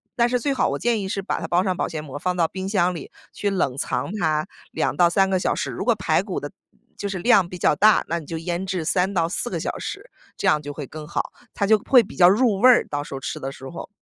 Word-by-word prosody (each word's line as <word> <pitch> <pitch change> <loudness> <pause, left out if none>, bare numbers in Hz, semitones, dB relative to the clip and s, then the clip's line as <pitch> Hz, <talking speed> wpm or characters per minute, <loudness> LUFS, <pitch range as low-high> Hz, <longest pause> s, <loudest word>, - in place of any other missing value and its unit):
但 235 0 +3
是 250 0 +1
最 275 +4 0
好 265 - +1
我 - - -2
建 235 -3 0
议 190 - -4
是 195 - -2
把 - - -2
它 - - -4
包 175 +1 +2
上 185 -2 0
保 - - -1
鲜 155 -2 -5
膜， 145 -1 -7
放 180 +3 -1
到 165 -2 +3
冰 190 +3 -5
箱 180 -3 +2
里， 165 - -8 0.2
去 205 - -1
冷 170 -10 0
藏 155 - -2
它 155 -3 +1 0.3
2 - - -1
到 175 -1 +5
3 195 +2 +3
个 190 - +2
小 - - 0
时。 - - -3
如 - - -4
果 - - +3
排 - - +1
骨 - - -4
的 - - -7 0.5
就 205 - -3
是 195 -2 -4
量 195 -2 +4
比 180 - -8
较 165 - +2
大， 210 +5 +5
那 170 +1 -1
你 155 - -11
就 165 - -5
腌 175 +2 -3
制 185 -3 -2
3 180 +3 +1
到 170 -3 +1
4 185 - -2
个 - - -3
小 - - -3
时， - - -6 0.3
这 - - -2
样 150 - +4
就 145 0 -7
会 145 -1 -6
更 155 +1 -9
好， - - -3 0.2
它 200 - 0
就 220 +1 +6
会 250 +4 +5
比 210 - -12
较 175 - +7
入 210 +2 +3
味 245 - +5
儿， 250 - +5
到 145 0 -3
时 145 - -10
候 135 - -4
吃 140 - -5
的 135 - -4
时 135 -1 -10
候。 170 - -8
180 Hz, 295 characters per minute, -23 LUFS, 160-200 Hz, 0.5 s, 较